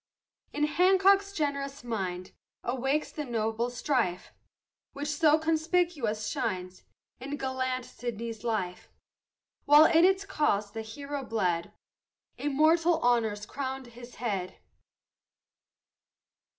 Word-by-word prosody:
In 295 - -2
Hancock's 385 +5 +4
generous 280 -6 -3
mind 185 -6 -4 0.3
Awakes 265 +5 -1
the 300 - -4
noble 230 -1 -1
strife, 240 -7 -1 0.6
Which 290 +1 -4
so 300 +1 +4
conspicuous 315 -8 0
shined 185 0 -3 0.4
In 280 +3 -5
gallant 260 -1 -2
Sydney's 230 -2 -6
life; 200 -6 -3 0.8
While 295 +2 +8
in 325 +1 +5
its 385 +2 +3
cause 255 - 0
the 225 - -5
hero 280 +5 -6
bled, 180 -8 -1 0.6
Immortal 315 +4 +3
honors 225 -4 +1
crown'd 265 +1 -5
his 240 +1 -12
head. 195 -7 -3
260 Hz, 100 wpm, -29 LUFS, 220-300 Hz, 0.8 s, While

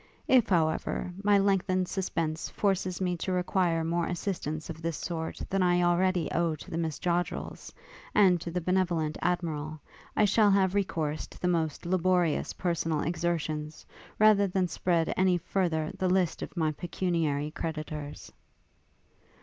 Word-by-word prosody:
If, 255 -4 +4
however, 170 0 0
my 205 0 +5
lengthened 190 -2 +2
suspense 165 -5 -2
forces 190 -3 0
me 180 -2 0
to 185 - -3
require 180 -2 +1
more 170 +1 0
assistance 170 -4 -3
of 165 -1 -7
this 165 -1 -2
sort 160 -2 -4
than 195 0 0
I 175 -1 +3
already 175 0 +2
owe 170 -2 +1
to 150 - -12
the 165 - -2
Miss 160 -3 -2
Joddrels, 175 0 -2 0.4
and 185 -5 +5
to 170 - -5
the 180 +1 -2
benevolent 170 -3 0
Admiral, 155 -3 -2 0.4
I 215 - +5
shall 210 +1 +4
have 195 -2 +3
recourse 160 -6 -1
to - - -15
the 180 - -1
most 165 -4 -1
laborious 180 -2 +1
personal 165 -3 -1
exertions, 160 -2 -2 0.3
rather 210 -2 +5
than 185 -1 0
spread 170 -2 0
any 185 -1 +3
further 165 -3 -1
the 185 - 0
list 185 -2 +1
of - - -7
my 160 -2 +2
pecuniary 160 -3 -1
creditors.' 155 -2 -5
175 Hz, 150 wpm, -29 LUFS, 160-185 Hz, 0.4 s, my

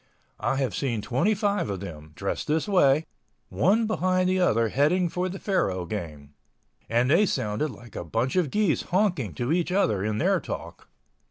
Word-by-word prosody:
I 120 - 0
have 135 -6 -1
seen 115 -2 -2
25 200 - 0
of 100 -2 -3
them, 80 -5 -9
dressed 100 - -3
this 155 +4 0
way, 155 -6 +4 0.4
one 195 - +2
behind 185 -3 +1
the 185 0 +1
other 115 -10 +2
heading 165 - +2
for 180 +2 -2
the 190 - -6
faro 95 - -1
game—and 85 - -4
they 195 +6 +5
sounded 110 +2 -1
like 120 -4 -13
a - - -4
bunch 115 - -1
of 180 -6 +2
geese 205 0 +1
honking 175 - 0
to 120 +3 -2
each 175 0 0
other 110 - +1
in 105 0 -1
their - - +2
talk. - - -8
135 Hz, 170 wpm, -26 LUFS, -, 0.4 s, they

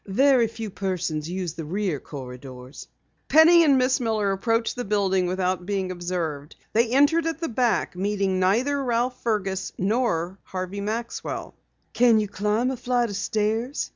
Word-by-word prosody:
Very 250 +3 +4
few 225 -1 -7
persons 175 -5 -3
use 180 -3 -3
the 165 - -6
rear 185 -2 -2
corridors." 125 -1 -10 0.4
Penny 335 +2 +7
and 285 -4 +4
Miss 255 +1 +2
Miller 220 -4 0
approached 225 +4 0
the 245 - -3
building 195 -3 +1
without 185 0 -1
being 195 -2 -1
observed. 170 -5 -4 0.2
They 230 +2 +3
entered 290 +6 +3
at 325 0 -3
the 330 - -2
back, 240 -5 0
meeting 195 0 0
neither 250 +10 +1
Ralph 245 +1 -1
Fergus 195 -4 -1
or 190 -4 0
Harvey 185 +2 -5
Maxwell. 225 +3 -4 0.4
"Can 235 -2 +5
you 210 - -1
climb 210 +5 0
a 260 - -4
flight 245 -1 0
of - - -5
stairs?" 220 +6 -1
210 Hz, 155 wpm, -24 LUFS, 185-245 Hz, 0.4 s, Penny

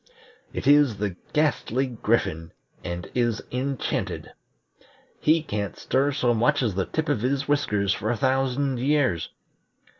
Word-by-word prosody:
It - - -5
is 145 -5 +5
the 100 -3 -2 0.2
Ghastly 145 -4 +1
Griffin 105 -9 -1 0.3
and 85 0 -5
is 120 -3 0
enchanted. 130 +1 -2 0.9
He 155 +1 +3
can't 100 - -3
stir 140 +2 +1
so 125 -3 +1
much 135 +5 +2
as 110 -5 0
the 95 +1 -1
tip 160 0 -2
of 145 -8 0
his 135 +3 0
whiskers 105 -9 +1
for 110 - -3
a 120 - 0
thousand 135 +1 +1
years. 130 - +1
125 Hz, 140 wpm, -25 LUFS, 105-140 Hz, 0.9 s, is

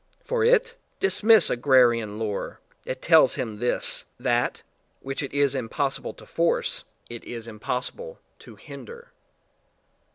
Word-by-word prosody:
For 485 -2 -1
it? 475 0 +3 0.3
Dismiss 220 - +4
agrarian 120 -4 +3
lore; 110 -2 -4 0.3
it 130 - -5
tells 160 -5 +5
him 110 -4 -5
this: 120 +1 +1
that - - 0 0.4
which 135 +1 -5
it 140 - -5
is 140 -1 +2
impossible 135 +2 -3
to - - -15
force, - - -1 0.2
it 120 -1 -8
is 115 -2 -7
impossible 125 - -5 0.2
to - - -14
hinder. 475 +1 -12
135 Hz, 125 wpm, -25 LUFS, -, 0.4 s, tells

